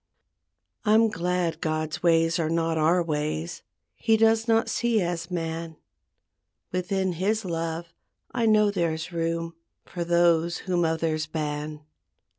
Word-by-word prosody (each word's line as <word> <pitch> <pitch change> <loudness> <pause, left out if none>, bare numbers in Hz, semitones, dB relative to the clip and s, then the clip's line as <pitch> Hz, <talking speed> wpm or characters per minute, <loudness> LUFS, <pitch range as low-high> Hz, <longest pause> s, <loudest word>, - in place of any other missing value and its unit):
I'm 220 +1 +4
glad 175 -3 -1
God's 155 -2 -2
ways 165 -1 +3
are 160 -2 0
not 165 0 0
our 165 +3 +3
ways 150 - -3 0.3
He 225 0 +2
does 225 +1 +3
not 225 0 +3
see 235 -2 +1
as 175 -2 -2
man; 165 -2 -4 0.9
Within 185 0 -1
His 205 +5 0
love 165 0 -3 0.4
I 235 -2 0
know 210 -1 +4
there's 170 -3 -2
room 165 0 -2 0.3
For 175 - -4
those 170 0 +3
whom 175 -2 +1
others 160 -1 0
ban. 150 -1 -4
170 Hz, 125 wpm, -26 LUFS, 160-185 Hz, 0.9 s, I'm